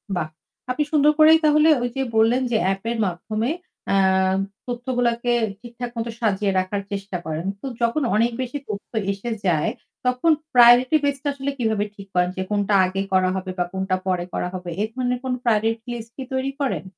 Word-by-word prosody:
বাহ! 165 -3 -1 0.4
আপনি 300 +4 +1
সুন্দর 300 -1 +5
করেই 315 +1 +8
তাহলে 305 +1 +5 0.2
ওই 245 - 0
যে 270 - -1
বললেন 225 +3 +4
যে 225 - +3
অ্যাপের 195 +5 -1
মাধ্যমে 215 +6 -2 0.4
অ্যাঁ 190 -1 +3 0.3
তথ্যগুলাকে 245 -1 -1 0.3
ঠিকঠাক 240 0 -7
মতো 230 +1 -2
সাজিয়ে 205 -3 +1
রাখার 185 +2 -2
চেষ্টা 200 -2 -4
করেন। 160 +2 -3 0.2
তো - - -8 0.2
যখন 235 +6 +1
অনেক 230 +3 +3
বেশি 255 +2 -3
তথ্য 200 -1 -6 0.2
এসে 200 +4 -5 0.2
যায়, 160 -4 +2 0.3
তখন 250 +6 +3 0.2
প্রায়োরিটি 245 +3 +7
বেজ 285 -1 +1
টা - - -2
আসলে 280 0 -3
কিভাবে 220 -4 0
ঠিক 200 -1 -11
করেন 180 0 +2
যে 185 - -1
কোনটা 205 0 0
আগে 190 +1 -2
করা 185 -1 +4
হবে 190 0 -4
বা 180 - +2
কোনটা 190 0 0
পরে 180 -2 0
করা - - -1
হবে? 180 -1 -6
এ - - +3
ধরনের 250 0 -1
কোন 260 -1 -1
প্রায়োরিটি 225 0 +1
লিস্ট 230 -1 -7
কি 265 - -4
তৈরি 265 +1 -1
করেন? 275 - -1
225 Hz, 185 wpm, -23 LUFS, 190-250 Hz, 0.4 s, করেই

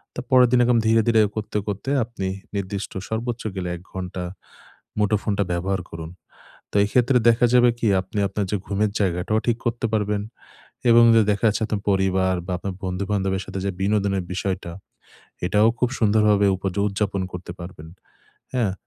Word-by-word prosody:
তারপরের 125 0 +4
দিন 125 - +4
এরকম 120 0 +3
ধীরে, 115 0 +5
ধীরে 115 -2 +5
করতে, 105 -1 -3
করতে 105 +5 -4
আপনি 115 -4 -5 0.3
নির্দিষ্ট 100 0 -3 0.2
সর্বোচ্চ 115 +2 -3
গেলে 90 -2 -3
১ 85 - -11
ঘন্টা 90 -1 -5 0.8
মুঠোফোনটা 105 0 +1
ব্যবহার 95 +2 -1
করুন। 80 0 -7 0.6
তো - - -1
এক্ষেত্রে 125 +4 +3
দেখা 115 +1 +4
যাবে 125 -1 +6
কি? 115 - -1
আপনি 95 +3 -6
আপনার 100 +1 -2
যে - - +2
ঘুমের 105 +1 0
জায়গাটাও 95 +2 +1
ঠিক 120 -2 +2
করতে 120 0 0
পারবেন 105 -1 0 0.7
এবং 120 0 +7
দে 115 - +6
দেখা 100 +1 -3
যাচ্ছে 105 - -1
আপনার 105 -2 -3
পরিবার 95 -1 +2
বা, 95 - -3
আপনার 95 +1 -5
বন্ধু-বান্ধবের 95 +1 -1
সাথে 95 0 -5
যে - - +1
বিনোদনের 100 -1 +1
বিষয়টা, 90 -2 -3 0.7
এটাও 105 +4 +4
খুব 125 - +2
সুন্দরভাবে 105 -2 +3
উপয 95 +1 -3 0.2
উদযাপন 100 -1 -1
করতে 90 -1 -7
পারবেন, 85 -3 -9 0.7
হ্যাঁ? 115 -7 +1
100 Hz, 160 wpm, -23 LUFS, 95-110 Hz, 0.8 s, এবং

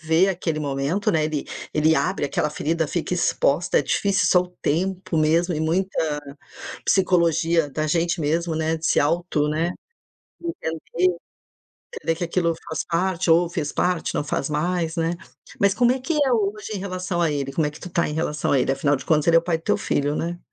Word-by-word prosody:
vê 160 +4 +3
aquele 165 -4 -2
momento, 145 +7 0
né, 155 -1 +2
ele 155 -2 -3 0.3
ele 155 +1 +4
abre 145 - 0
aquela 150 +2 0
ferida, 160 +2 -1
fica 175 +1 -2
exposta, 170 -1 +2
é - - +1
difícil. 195 +7 +1
Só 180 - +5
o 180 - -10
tempo 180 +2 -1
mesmo 165 +3 +2
e 155 - -2
muita 185 +4 0 0.9
psicologia 170 -4 +2
da 155 +2 -2
gente 170 +2 +1
mesmo, 165 +3 0
né, 160 +1 0
de 160 - -6
se - - +3
auto, 155 -1 +1
né, 165 +3 0 0.7
entender 180 - -1 0.8
entender 165 - -1
que 175 - -2
aquilo 170 -1 0
faz 160 - -2
parte 180 0 0
ou 170 +1 +5
fez 155 -4 -2
parte, 180 -2 0
não 145 - -1
faz 140 0 -2
mais, 165 +2 -1
né. 165 +1 0 0.5
Mas 200 0 +4
como 240 +2 +4
é 265 - -2
que 325 +6 -2
é 285 -4 +2
hoje 210 -1 -1
em - - -2
relação 185 -2 -3
a 165 - +2
ele? 140 -1 -3
Como 155 +2 +1
é 150 - -2
que 150 - -13
tu 180 - -8
tá 170 -1 +1
em 150 - -4
relação 150 -1 -1
a 140 - +4
ele? 135 - +1
Afinal 140 +1 +1
de - - -9
contas, 155 -2 +2
ele 165 - +6
é - - +7
o - - -19
pai 170 -1 0
do 165 - -22
teu - - +2
filho, 145 +1 -1
né. 170 +1 -3
165 Hz, 210 wpm, -23 LUFS, 155-180 Hz, 0.9 s, é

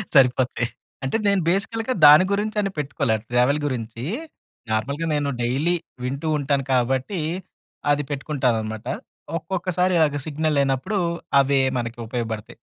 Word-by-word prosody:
సరిపోతాయి. 125 -2 +4 0.4
అంటే 135 +11 0
నేను 200 -2 +3
బేసికల్‌గా 225 +6 0
దాని 150 +5 +9
గురించి 210 +1 0
అని 195 -1 -1
పెట్టుకోలే 140 -5 0
ట్రావెల్ 125 +5 +3
గురించి, 120 -3 -4 0.7
నార్మల్‌గా 140 +9 -1
నేను 145 -1 0
డైలీ 140 +9 +1 0.3
వింటూ 140 +5 -3
ఉంటాను 140 -1 0
కాబట్టి 130 - +1 0.7
అది 145 0 +2
పెట్టుకుంటానన్నమాట. 125 -7 -1 0.5
ఒక్కొక్కసారి 180 +1 0
అదే 145 -1 -2
సిగ్నల్ 155 0 0
లేనప్పుడు 135 +9 0 0.4
అవే 140 0 +3 0.2
మనకు 120 0 -4
ఉపయోగపడతాయి. 115 -3 -4
140 Hz, 120 wpm, -23 LUFS, 125-165 Hz, 0.7 s, దాని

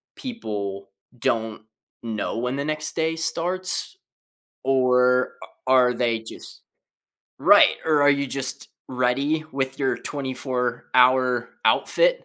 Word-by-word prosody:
people 105 - -6 0.3
don't 110 -2 -2 0.4
know 110 -1 -3
when 125 +2 -2
the 140 +1 -3
next 155 0 -3
day 160 0 0
starts, 175 +3 -1 0.7
or 125 -1 +2
a - - -11 0.2
are 125 -1 +5
they 115 -2 0
just 110 - -11 0.8
Right, - - +6
or 150 -2 +3
are 145 - +6
you 140 0 +1
just 135 0 -2 0.2
ready 135 +5 0
with 135 -1 -3
your 135 -2 0
twenty-four-hour 125 -2 0 0.2
outfit - - +2
130 Hz, 115 wpm, -23 LUFS, 125-150 Hz, 0.8 s, Right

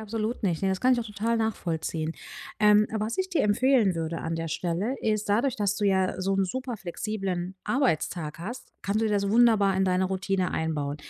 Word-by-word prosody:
absolut 220 +2 -3
nicht, 180 -3 0
ne, 195 - +2
das 190 -1 -1
kann 255 0 +4
ich - - -1
auch - - -4
total 215 +3 -1
nachvollziehen. 165 -7 -2 0.5
Ähm, 210 0 +5
was 220 - -2
ich 375 - 0
dir 350 -4 +1
empfehlen 220 -1 +3
würde 165 0 -3
an 165 0 -3
der 165 0 -3
Stelle 180 - -2
ist, 215 -1 -1
dadurch, 235 +6 +2
dass 205 -2 0
du 210 - -1
ja 190 -2 +1
so 195 +1 0
'n 195 0 +2
superflexiblen 195 -5 -4
Arbeitstag 170 - -1
hast, 235 +8 -7
kannst 200 +3 0
du - - +1
dir 210 - 0
das 200 -1 +1
wunderbar 220 -4 +4
in 190 - +2
deine 185 0 +2
Routine 190 0 -1
einbauen. 150 -3 -2
200 Hz, 200 wpm, -27 LUFS, 180-220 Hz, 0.5 s, Ähm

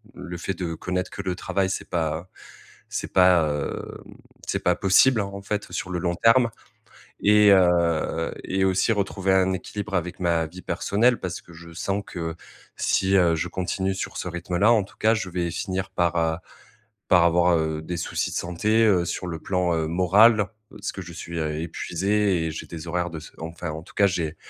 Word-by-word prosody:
le 90 -1 -7
fait 95 - -3
de 85 -2 -3
connaître 90 +2 -3
que 100 - -5
le 90 -1 -2
travail, 95 +1 -1
c'est - - -4
pas 80 +1 -2 0.6
c'est - - -4
pas, 90 -4 +5
hem, 75 - -4 0.5
c'est - - -1
pas - - +3
possible 110 +5 +4
en 100 0 -4
en 100 - -7
fait 105 +1 -3
sur 95 - -4
le 90 - -2
long 85 0 0
terme. 115 +4 +5 0.7
Et, 105 0 +6
heu, 85 -3 +2
et 95 0 0
aussi 95 +4 +2
retrouver 95 -2 0
un 95 0 +3
équilibre 100 +2 -6
avec 90 +1 -2
ma 85 -2 +1
vie 90 +4 -11
personnelle, 120 +4 +1
parce 90 -1 -4
que 85 - -16
je 85 +1 -12
sens 100 +3 -2
que 80 -2 -5 0.4
si, 95 0 +1
heu, 85 -3 +4
je 85 +3 -2
continue 95 +2 -2
sur - - -5
ce - - -3
rythme 85 0 -4
là, 110 +4 +5
en 105 -4 +3
tout - - -18
cas, 110 +1 +3
je 110 -4 -3
vais 85 -1 -2
finir 95 +1 -3
par, 85 -1 0
heu, 80 -1 +1 0.7
par 90 -3 +5
avoir, 85 +1 +4
heu, 80 -1 -1
des 90 +2 -4
soucis - - -2
de - - -4
santé, 105 +6 +1
heu, 90 -4 +3
sur 85 +1 -3
le 85 -2 -4
plan, 90 -2 0
heu, 80 -1 0
moral, 100 +5 +5 0.2
parce 100 - -6
que - - -7
je 85 -1 -10
suis, 85 0 -6
heu, 75 -1 -1
épuisé 95 +2 0
et - - -2
j'ai 75 - -7
des 85 -1 -8
horaires 90 +1 -1
de 80 -1 -7
ce 80 - -13
enfin 80 -1 -5
en 80 +1 -6
tout - - -17
cas, 100 - +4
j'ai 80 -3 -2
90 Hz, 205 wpm, -24 LUFS, 85-100 Hz, 0.7 s, Et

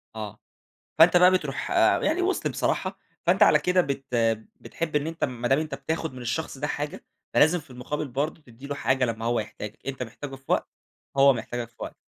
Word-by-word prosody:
آه، 105 -1 -6 0.6
فأنت 175 +2 +7
بقى 180 +1 +8
بتروح 185 - -1 0.3
يعني 345 +4 +1
وص 385 +1 0
بصراحة - - -1 0.3
فأنت - - +4
على - - +7
كده 180 0 +3
بت 140 -4 -2 0.6
بتحب 160 -3 -3
إن 145 +1 +1
أنت 165 0 -2
ما 120 -2 -2
دام 135 - +4
أنت 155 -3 -3
بتاخد 160 0 -3
من 125 -1 -8
الشخص 135 +3 -3
ده 150 - -1
حاجة، 145 0 -4 0.3
فلازم 160 +3 +5
في 150 -2 -20
المقابل 140 +4 -4
برضه 145 +5 -2
تدّي 125 +2 -13
له 145 - -3
حاجة 130 0 +1
لمّا 115 -1 -3
هو 120 -1 +1
يحتاجك، 105 0 -7
أنت 135 -1 -4
محتاجه 135 +4 -7
في 135 - -22
وقت، - - +1 0.5
هو 135 0 +7
محتاجك 120 0 -4
في 115 - -36
وقت، - - -6
140 Hz, 200 wpm, -26 LUFS, 120-160 Hz, 0.6 s, بقى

